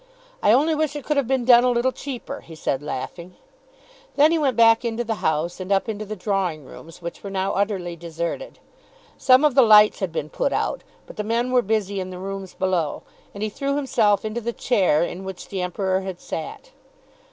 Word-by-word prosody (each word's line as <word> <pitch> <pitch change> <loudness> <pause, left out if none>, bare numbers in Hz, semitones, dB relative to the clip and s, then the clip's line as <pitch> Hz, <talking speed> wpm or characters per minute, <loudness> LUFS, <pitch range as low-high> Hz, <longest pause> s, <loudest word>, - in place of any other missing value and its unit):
"I - - +4
only 295 +7 +4
wish 305 -1 -1
it 290 - -6
could 300 - 0
have 275 -4 +1
been 260 -2 0
done 240 -1 +7
a 250 - +3
little 245 +1 +1
cheaper," 260 -2 -7
he 165 - -12
said 135 -3 -2
laughing. 170 +5 -6 0.8
Then 295 +2 +5
he 335 - +2
went 270 -5 0
back 225 0 +5
into 235 0 -2
the 225 -1 -2
house, 160 +3 -1
and 185 +1 -6
up 195 +2 +2
into 215 -1 -4
the 215 +1 -5
drawing 185 -7 -2
rooms 165 +5 -13
which 170 - -6
were 200 - -5
now 195 0 -1
utterly 190 -4 -1
deserted. 170 - -5 0.6
Some 260 +3 +5
of 295 - +3
the 265 - +6
lights 210 -2 +6
had 190 -3 -2
been 155 -2 -4
put 280 - -1
out, - - -1 0.2
but - - -13
the 210 - -2
men 235 +3 -1
were 250 -1 +4
busy 205 -2 -1
in 185 0 -4
the 185 - -8
rooms 195 0 -6
below, 180 -5 -1 0.3
and 200 - -5
he 215 - -1
threw 275 +5 -2
himself 220 -8 +2
into 215 +2 -3
the 235 +1 -3
chair 185 -12 +2
in 175 +2 -5
which 190 -1 -8
the 190 -2 -3
Emperor 185 +1 -1
had 190 -2 -6
sat. - - -7
205 Hz, 215 wpm, -23 LUFS, 180-245 Hz, 0.8 s, done